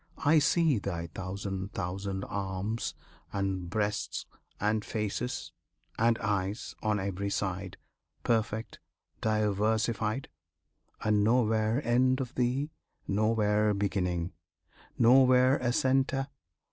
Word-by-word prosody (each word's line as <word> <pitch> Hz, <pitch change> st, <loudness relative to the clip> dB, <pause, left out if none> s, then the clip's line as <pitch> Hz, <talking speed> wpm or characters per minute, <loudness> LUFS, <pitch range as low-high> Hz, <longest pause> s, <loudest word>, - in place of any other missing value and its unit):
I 155 Hz, +2 st, +6 dB
see 155 Hz, -4 st, +3 dB
Thy 85 Hz, -4 st, -4 dB
thousand 95 Hz, +1 st, -4 dB
thousand 95 Hz, +1 st, -3 dB
arms, 100 Hz, +3 st, -3 dB, 0.4 s
and 95 Hz, -3 st, -2 dB
breasts, 105 Hz, +1 st, -1 dB, 0.3 s
and 105 Hz, +1 st, +1 dB
faces, 110 Hz, +4 st, -3 dB, 0.5 s
And 115 Hz, 0 st, +4 dB
eyes, 100 Hz, 0 st, -2 dB
on 105 Hz, -1 st, +1 dB
every 100 Hz, +1 st, -2 dB
side 95 Hz, -1 st, -3 dB, 0.5 s
Perfect, 110 Hz, -1 st, -1 dB, 0.4 s
diversified; 110 Hz, +2 st, +1 dB, 0.7 s
And 105 Hz, -1 st, +2 dB
nowhere 110 Hz, +2 st, +2 dB
end 130 Hz, +2 st, +3 dB
of 125 Hz, -2 st, -4 dB
Thee, 130 Hz, +5 st, 0 dB, 0.4 s
nowhere 105 Hz, 0 st, +2 dB
beginning, 90 Hz, -4 st, -1 dB, 0.6 s
Nowhere 130 Hz, +2 st, +6 dB
a 120 Hz, -1 st, 0 dB
centre! 135 Hz, +2 st, +1 dB
105 Hz, 95 wpm, -30 LUFS, 100-120 Hz, 0.7 s, I